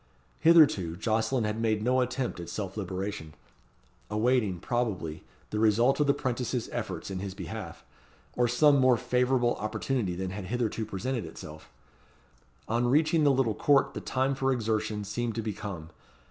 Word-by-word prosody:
Hitherto 145 - +5
Jocelyn 115 +4 0
had 105 +1 -2
made 110 -2 +1
no 130 +2 +2
attempt 125 -4 -2
at 85 - -7
self 95 -3 -5
liberation; 95 -5 -5 0.7
awaiting, 105 -3 +1
probably, 100 -9 -2 0.3
the 105 - -1
result 115 +6 +3
of 150 - +2
the 140 - +5
'prentices' 125 -3 -2
efforts 100 -6 -4
in 95 - -3
his 95 -1 -5
behalf, 105 -7 -7 0.5
or 120 0 +2
some 140 +4 +4
more 130 -2 +5
favourable 125 0 +1
opportunity 110 -2 -2
than 95 +1 -4
had 95 0 -6
hitherto 115 0 -2
presented 120 +2 -3
itself. 80 -1 -10 1.0
On 120 +2 +1
reaching 155 +4 +3
the - - +6
little 130 -4 +2
court 140 +4 +3
the - - -5
time 130 +1 0
for 135 0 0
exertion 110 -3 -1
seemed 115 +3 -3
to 115 - -2
be 105 -1 -2
come. 90 -6 -7
115 Hz, 160 wpm, -28 LUFS, 100-130 Hz, 1.0 s, the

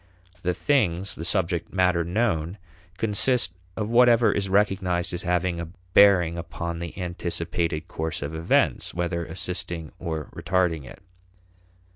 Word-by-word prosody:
The 90 0 0
things, 100 - +1
the 80 - -7
subject 85 -1 -1
matter 90 -2 +2
known, 90 -2 -1 0.4
consist 110 -2 +2 0.2
of 105 -2 -1
whatever 120 0 +5
is 100 -1 -1
recognized 95 -3 +1
as 90 - -3
having 90 -1 0
a 85 - -4 0.3
bearing 90 -5 +5
upon 85 0 -5
the 85 -1 -6
anticipated 85 -2 -2
course 80 -2 -4
of 70 +2 -5
events, 80 0 +1
whether 85 -1 -1
assisting 85 -1 -4
or 80 -4 -4
retarding 90 -4 0
it. - - -13
90 Hz, 130 wpm, -25 LUFS, 85-95 Hz, 0.4 s, whatever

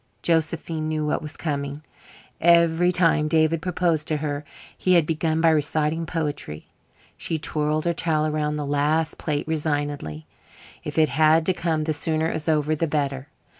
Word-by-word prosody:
Josephine 160 -1 0
knew 155 -1 -1
what 150 - -1
was 155 0 -7
coming. 145 -1 -4 0.6
Every 170 +1 +4
time 165 -4 +3
David 155 +1 +2
proposed 170 -3 0
to 155 - 0
her 145 -1 -3 0.3
he 185 - +1
had 170 -3 +5
begun 160 0 0
by 165 -1 +5
reciting 155 +1 0
poetry. 150 - -4 0.5
She 165 - -2
twirled 155 0 -1
her 170 - +2
towel 160 -2 0
around 150 -1 -1
the 150 -1 -3
last 150 +3 0
plate 150 -2 -2
resignedly. 145 - -2 0.6
If - - -6
it 155 -1 +4
had 155 +1 +3
to 185 - +2
come, 165 -3 -1
the 155 0 -1
sooner 160 +2 0
it - - -4
was 160 0 -3
over 155 0 +1
the 165 +2 -1
better. 140 -2 -2
155 Hz, 170 wpm, -24 LUFS, 150-165 Hz, 0.6 s, had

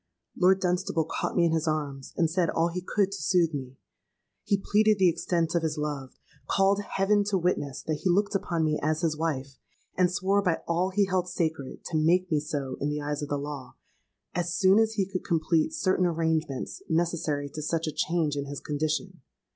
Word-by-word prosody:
Lord 185 +1 +4
Dunstable 180 -2 0
caught - - -3
me 175 - +4
in 165 - +2
his 160 0 0
arms, 145 -3 -2
and 165 - +3
said 170 0 +1
all 165 +1 +1
he 180 +2 -4
could 195 +2 0
to 200 - -5
soothe 170 -4 +2
me. 130 -2 -6 0.7
He 200 - +2
pleaded 210 +2 +3
the 185 -2 +5
extent 170 0 0
of 170 - +2
his 160 -1 -2
love, 145 -3 -4 0.3
called 195 +1 +3
heaven 205 +1 +1
to 200 -1 +1
witness 165 -7 -1
that 155 -1 -2
he 185 - +1
looked 200 +4 +2
upon 170 -4 0
me 155 -1 +1
as 155 +2 0
his 160 -3 +1
wife, 140 -4 -3 0.4
and 180 -1 +3
swore 190 +2 +2
by 180 -4 0
all 175 +2 +1
he 200 +1 +2
held 185 -1 0
sacred 160 -6 -3
to 160 - -1
make 180 +3 +3
me 155 - +3
so 145 -3 -4
in 145 - 0
the 150 0 -2
eyes 145 0 -3
of 145 - -4
the 145 - 0
law 140 -2 -6 0.6
as 175 0 -1
soon 195 +2 +5
as 220 0 +2
he 200 -3 +1
could 185 -1 -4
complete 165 - +1
certain 190 - +1
arrangements 160 -4 -1
necessary 160 -3 0
to 155 - -5
such 165 +2 -1
a 155 - -2
change 160 -3 0
in 140 0 -3
his 140 0 -5
condition. 155 +4 -2
165 Hz, 205 wpm, -27 LUFS, 150-185 Hz, 0.7 s, the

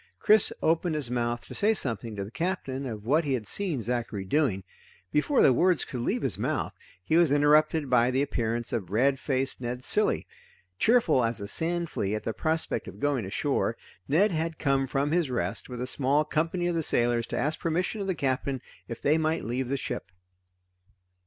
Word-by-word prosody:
Chris 215 -1 +5
opened 165 0 +1
his 140 -6 -1
mouth 120 -1 -1
to - - -10
say 220 +2 +2
something 115 - -1
to 100 - -3
the 105 - -11
Captain 140 -5 -3
of 110 -3 -7
what 150 +7 +3
he 140 -3 -1
had 115 -4 -5
seen 160 - -1
Zachary 115 -4 -3
doing. 100 -4 +1 0.5
Before 150 - +3
the 130 - +6
words 180 +6 +2
could 130 - -6
leave 120 - -1
his - - -1
mouth, - - -1 0.3
he 160 - +2
was 170 -4 +4
interrupted 150 +1 +3
by 125 -1 +3
the 130 +2 +1
appearance 120 -3 -2
of 105 -7 -2
red 130 +6 +2
faced 135 -2 -2
Ned 125 +1 -4
Cilley. - - +2 0.5
Cheerful 215 - +4
as 115 0 0
a 100 - -5
sand 170 +6 -1
flea 100 +1 -1
at 105 - -5
the 115 - -2
prospect 160 +5 -1
of - - -10
going 140 -6 0
ashore, 115 +3 -1 0.3
Ned 190 +9 +3
had 160 0 -2
come 135 -2 +1
from 140 +3 0
his 170 -4 +1
rest 95 -4 -2
with 125 -1 -6
a 125 - -2
small 140 +3 +1
company 165 +4 -1
of 175 - +1
the 165 - 0
sailors 120 -5 +1
to - - -4
ask 150 +2 -1
permission 180 +6 -1
of 195 - -3
the 190 - 0
Captain 135 -1 -1 0.3
if 115 - -6
they 155 +3 +3
might 160 +1 0
leave 125 +2 -2
the 140 - 0
ship. 85 - -5
135 Hz, 200 wpm, -27 LUFS, 120-160 Hz, 0.5 s, the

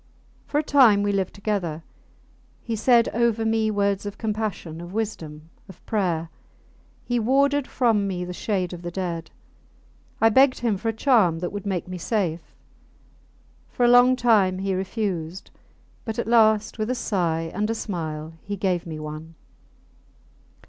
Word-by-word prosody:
For 290 - -1
a 300 - +2
time 245 -9 +5
we 205 - +1
lived 195 -2 -1
together. 190 -6 -3 0.8
He 230 - -3
said 235 +1 +4
over 230 -1 +1
me 220 0 +1
words 200 -2 0
of 205 - -7
compassion, 210 -7 -4
of 175 +2 -9
wisdom, 165 -8 -5 0.2
of 185 - -15
prayer. 175 -6 -1 0.8
He 245 -1 0
warded 275 +4 +2
from 225 -5 +1
me 180 -2 -3
the 180 - -6
shade 185 -2 -2
of 175 - -8
the 175 - -5
dead. 170 -2 -4 0.9
I 225 - +5
begged 260 +3 +4
him 230 -4 +1
for 225 +4 -2
a - - +2
charm 220 - +3
that 175 +1 -4
would 205 0 -6
make 185 -3 -2
me 180 0 -6
safe. 175 -4 -2 1.1
For 245 - 0
a - - +5
long 245 +1 +6
time 215 -7 +3
he 195 0 -2
refused; 185 -3 -3 0.5
but 225 -2 -5
at 235 - -1
last, 220 -2 +3
with 215 +2 -1
a 255 - 0
sigh 165 -8 -1
and 210 +3 -1
a 225 - 0
smile, 160 -6 -5
he 205 0 -5
gave 180 -2 -1
me 155 -2 -6
one. 155 +2 -8
200 Hz, 160 wpm, -24 LUFS, 175-225 Hz, 1.1 s, long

